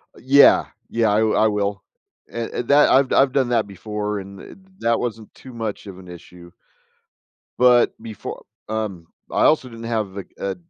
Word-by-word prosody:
Yeah. 140 +3 +5 0.2
Yeah, 115 -2 +1
I 105 - +2
I 110 0 +3
will, 100 -1 -2 0.5
and 115 -1 -4
and 120 - -4
that 145 +1 +5
I've 135 -1 +3
I've 135 -1 +3
done 130 -3 +1
that 115 -4 +1
before, 105 +1 -4
and 100 0 -12
th - - -12 0.2
that 115 0 +1
wasn't 115 -3 -5
too 130 - -13
much 110 -3 -5
of 95 -2 -10
an 90 - -14
issue. 85 0 -13 1.1
But 125 -1 +4
befo 110 -2 -8 0.2
um, 105 -6 -4 0.2
I - - +1
also 150 -4 +3
didn't 115 0 -10
have 110 -4 -3
a 95 - -6
a 100 -1 -3
110 Hz, 175 wpm, -21 LUFS, 100-120 Hz, 1.1 s, Yeah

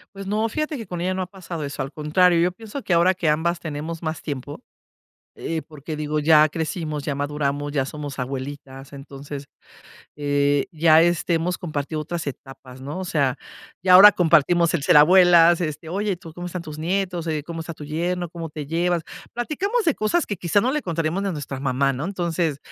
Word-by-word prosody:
Pues 195 0 -7
no, 215 +3 0
fíjate 305 +5 -2
que 225 -5 -8
con 175 -2 -5
ella 185 +1 0
no 190 - -2
ha 185 - -3
pasado 180 -4 -7
eso, 140 -1 -4
al 135 - -7
contrario, 165 +4 +3
yo 180 +1 +2
pienso 225 +7 -8
que 180 - 0
ahora 170 +2 +4
que 175 -4 -1
ambas 165 +3 0
tenemos 160 +1 -5
más 160 -1 -4
tiempo, 145 - -6 0.7
eh, 160 -1 -3
porque, 155 0 -8
digo, 150 0 -2
ya 155 0 +6
crecimos, 155 -2 -4
ya 145 - -2
maduramos, 145 0 -2
ya 135 -3 +1
somos 145 -1 -7
abuelitas, 135 +1 -6
entonces, 140 0 -8 0.7
eh, 145 -1 +1
ya 160 -1 +5
este 175 +1 +1
hemos 170 +2 0
compartido 155 -2 -4
otras 165 +1 -5
etapas, 135 -2 -9
¿no? 145 +7 -5
O - - -4
sea, 140 -5 0 0.4
ya 185 0 +5
ahora 205 +3 +10
compartimos 170 0 +3
el 155 - 0
ser 150 - +6
abuelas. 175 +1 +6
Este, 155 0 -4
oye, 200 +2 -1
¿tú 165 -2 -12
cómo 175 +1 -6
están 180 -1 -5
tus 155 -1 -9
nietos? 180 0 -2
Oye, 155 -2 -2
¿cómo 165 +2 -7
está 165 +1 -6
tu 150 - -10
yerno? 175 +4 -2
¿Cómo 165 -1 -7
te 150 -1 -7
llevas? 170 +2 0 0.3
Platicamos 390 - -1
de 320 - +3
cosas 215 +11 +1
que 205 - -3
quizá 175 +4 +1
no 250 - +1
le 300 +3 0
contaremos 170 +1 -2
de 195 - -1
nuestra 145 -3 -5
mamá, 135 0 +1
¿no? 135 +4 -4
Entonces, 170 -5 -1
165 Hz, 200 wpm, -23 LUFS, 145-180 Hz, 0.7 s, ahora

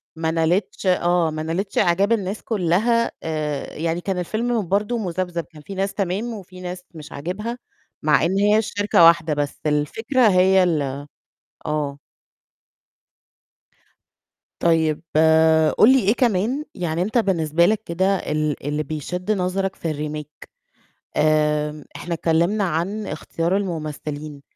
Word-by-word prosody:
ما 160 0 -1
نالتش 165 +6 0
آه، 175 -2 +2
ما 155 0 -4
نالتش 180 +5 -3
إعجاب 190 +5 +3
الناس 205 -2 -1
كلها 220 +4 +1
آآ، 155 -3 -3
يعني 165 +2 -2
كان 190 0 -2
الفيلم 220 +3 -1
برضو 205 +6 0
مذبذب، 180 -4 -3
كان 155 -1 -16
فيه 195 +6 -9
ناس 195 +1 -1
تمام 200 +5 -2
وفيه 185 -3 -10
ناس 180 0 -6
مش 150 -2 -10
عاجبها، 205 +11 -4 0.5
مع 150 +1 +3
إن 185 +3 0
هي 210 +1 +4
الشركة 205 -4 +2
واحدة، 170 -2 +5
بس 145 -1 -3
الفكرة 225 - +1
هي 190 0 +5
ال 145 -5 -1 0.6
آه. 145 -2 -2 2.6
طيب 160 -2 +2 0.8
قُل 230 - +7
لي 265 - +5
إيه 210 -2 +2
كمان 240 +3 +1
يعني 170 -3 -2
أنت 215 +6 0
بالنسبة 170 -6 +2
لك 215 +3 +1
كده 190 +4 +1
ال 155 -5 -2
اللي 150 +1 -1
بيشد 180 +7 -4
نظرك 190 0 -1
في 165 -2 -3
الRemake 150 0 -7 0.7
آمم، 150 -1 +1
إحنا 175 - -4
اتكلمنا 170 +6 +1
عن 190 +5 -2
اختيار 170 +3 -2
الممثلين، 155 -5 -5
175 Hz, 130 wpm, -22 LUFS, 155-200 Hz, 2.6 s, قُل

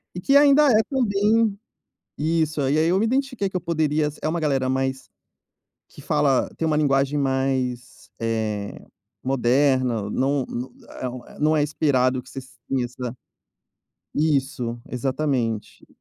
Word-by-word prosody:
E, 180 - -5
que 275 +7 +5
ainda 290 +1 +6
é, 215 0 +5
também 220 -4 +2 0.6
isso, 155 -1 0
aí 140 +3 +1
aí 160 +1 +3
eu 185 +2 +3
me 215 - +1
identifiquei 255 -5 -1
que 185 - -4
eu - - -1
poderia 155 -3 0
é - - 0
uma 170 +1 -1
galera 135 -4 0
mais 130 0 -2 0.8
que - - -14
fala 135 -3 +1
tem 165 - -1
uma 155 - +1
linguagem 140 0 +2
mais, 130 -2 -2
eh, 110 -3 -3 0.4
moderna, 130 -4 +1
não 135 +1 0 0.6
é 130 - -2
um 125 0 -9
é - - -15
não 155 +1 +3
é - - +3
inspirado 130 -4 +1
que 130 - -16
você 135 - -6
sissa 125 -2 -5 1.0
isso, 135 -5 0
exatamente. 130 -4 -2
140 Hz, 140 wpm, -23 LUFS, 130-160 Hz, 1.0 s, ainda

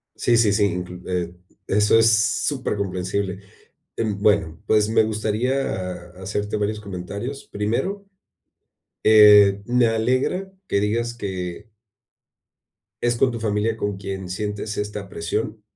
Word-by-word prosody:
Sí, 120 - +2
sí, 110 -3 +4
sí, 105 0 +3
inclu 90 -1 -4
e 90 -1 -2 0.3
eso 105 +2 +3
es 115 0 +5 0.4
supercomprensible, 100 -7 -2 0.6
em, 105 -3 -1
bueno, 100 -6 +2
pues 105 0 +3
me 110 0 +4
gustaría 110 +3 -1 0.6
ha 95 - -12
hacerte 105 +2 -2
varios 105 +1 -2
comentarios. 100 +7 -6
Primero, 120 - -2 1.0
eh, 105 -2 +7
me 125 0 +3
alegra 130 +12 0 0.2
que 100 - +1
digas 115 +3 -1
que 95 0 -6 1.3
es 120 0 +1
con 130 +2 +3
tu 115 - -5
familia 110 +1 0
con 105 -2 -2
quien 95 -1 -6
sientes 105 +3 -4
esta 105 -1 -4
presión 105 +6 -3
105 Hz, 125 wpm, -22 LUFS, 100-115 Hz, 1.3 s, eh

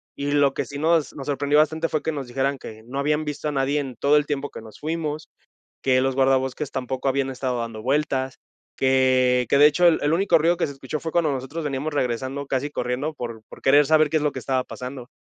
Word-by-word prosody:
Y 145 0 -3
lo 145 -2 +3
que - - -2
sí 140 - -7
nos 160 0 +2
nos 140 -1 -8
sorprendió 145 +1 +2
bastante 160 +2 +2
fue 155 - -1
que 160 - -1
nos 140 -3 -5
dijeran: 135 +3 -1
"Que 110 -3 -10
no 135 +3 -6
habían 150 +2 0
visto 150 +1 -4
a - - -2
nadie 140 +1 0
en 135 -4 -5
todo 145 +1 +3
el 150 - +2
tiempo 145 -1 -3
que - - -9
nos 110 -1 -13
fuimos, 155 -1 -3 0.5
que 130 -1 +3
los 135 0 +1
guardabosques 135 +1 +1
tampoco 130 +1 -3
habían 135 0 +1
estado 125 -2 -2
dando 115 -2 -5
vueltas", 135 0 0 0.4
que 130 -1 +3
que 140 - +4
de 145 - +7
hecho, 175 +4 +4
el 165 - +4
el 145 +2 +1
único 175 -1 +4
ruido 170 +2 +2
que 175 - 0
se 140 - -7
escuchó 135 +3 -5
fue 160 - -5
cuando 165 -4 +2
nosotros 135 +5 -4
veníamos 145 +1 -3
regresando, 130 +2 -2
casi 135 +2 -2
corriendo 130 +4 -2
por 115 -4 -6
por - - -12
querer 145 +2 +5
saber 155 -1 +4
qué 155 - +2
es 150 - -1
lo 150 - +1
que - - -5
estaba 130 -1 -1
pasando. 125 -1 -8
140 Hz, 240 wpm, -23 LUFS, 130-150 Hz, 0.5 s, de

